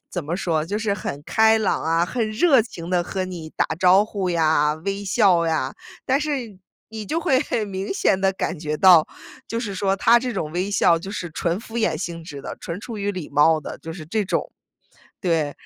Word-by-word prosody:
怎 175 -5 -4
么 165 +4 -2
说？ 165 -5 0
就 205 +5 -3
是 210 -2 0
很 145 -6 -5
开 220 0 +4
朗 215 - 0
啊， 165 +1 +2
很 230 -1 -1
热 265 +1 +4
情 175 -7 -9
地 175 -1 +1
和 185 0 -3
你 170 -4 -7
打 - - +1
招 185 +2 +6
呼 200 -4 -3
呀、 155 -3 +2
微 200 +1 -2
笑 190 -5 +3
呀， 155 -5 -1 0.3
但 265 +2 +3
是 260 -10 -3 0.3
你 220 -1 -7
就 330 +2 -1
会 265 -5 +3
很 230 -7 -2
明 195 +1 -4
显 190 - +2
地 195 0 +2
感 185 -3 -3
觉 150 -1 -3
到， 180 -5 +7 0.4
就 230 0 -3
是 205 -5 -4
说 195 +1 +1
他 230 +4 +5
这 250 0 -3
种 160 -7 -3
微 185 +3 -2
笑 170 -4 +3
就 190 +4 -8
是 175 -5 -5
纯 170 +5 -1
敷 230 0 -9
衍 175 -9 +1
性 165 -1 -5
质 145 -5 -8
的、 - - -7
纯 175 +4 -6
出 230 -1 -7
于 200 0 -1
礼 180 -5 -6
貌 155 +2 +4
的， - - -7
就 165 - -8
是 160 -3 -9
这 210 +4 -1
种。 - - -2 0.7
对， 160 -6 0
190 Hz, 235 characters per minute, -22 LUFS, 165-215 Hz, 0.7 s, 到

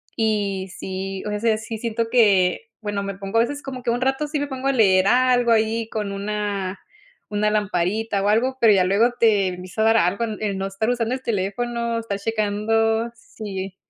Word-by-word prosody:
y 205 -4 -1
sí, 190 0 -5
o 210 0 -2
sea, 225 -1 +2
sí 220 +1 -6
siento 230 0 -2
que 200 -7 +4 0.2
bueno, 205 -1 -2
me 200 -1 -4
pongo 195 +2 -3
a - - +6
veces, 285 +5 -2
como 260 -2 -6
que 235 - -2
un 240 +1 -1
rato 270 +3 0
sí 295 0 -2
me 290 - -2
pongo 265 -1 -4
a 275 - +2
leer 195 -6 +4
algo 245 +1 +3
ahí 225 0 +1
con 210 -2 -3
una 200 -1 -3 0.5
una 210 0 +1
lamparita 205 +1 0
o - - +1
algo, 255 +5 +1
pero 225 -3 +7
ya 190 -2 +4
luego 200 +6 +3
te 210 -4 +4
empieza 185 +3 -5
a - - +3
dar 225 0 +5
algo 195 +3 +1 0.2
el 205 -3 -2
no 195 0 -2
estar 195 +4 -2
usando 240 -1 0
el 260 - -9
teléfono, 235 +3 -2
estar 205 -3 -4
checando, 225 +1 0
sí, 195 -4 -7
215 Hz, 200 wpm, -22 LUFS, 200-230 Hz, 0.5 s, pero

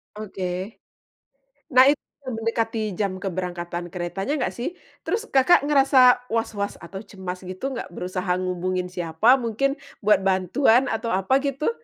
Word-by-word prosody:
Oke. 190 -1 -5 0.9
Nah, 255 +1 +7
itu 285 0 +3 0.3
mendekati 225 -2 -2
jam 195 -2 0
keberangkatan 175 -2 -4
keretanya 190 +9 -3
nggak - - -1
sih? 295 +9 -4 0.3
Terus 425 +8 -1
Kakak 270 +3 +5
ngerasa 260 -3 +5
waswas 220 -3 -2
atau 190 +3 -8
cemas 185 -2 -7
gitu 185 +10 -4
nggak, 235 - -5
berusaha 180 0 -3
ngehubungin 185 0 -2
siapa 180 +9 +3
mungkin 275 +5 -1 0.3
buat 210 0 +5
bantuan 220 +7 +3
atau 225 +1 -2
apa 195 +9 +2
gitu? 280 - -1
215 Hz, 130 wpm, -24 LUFS, 185-255 Hz, 0.9 s, Nah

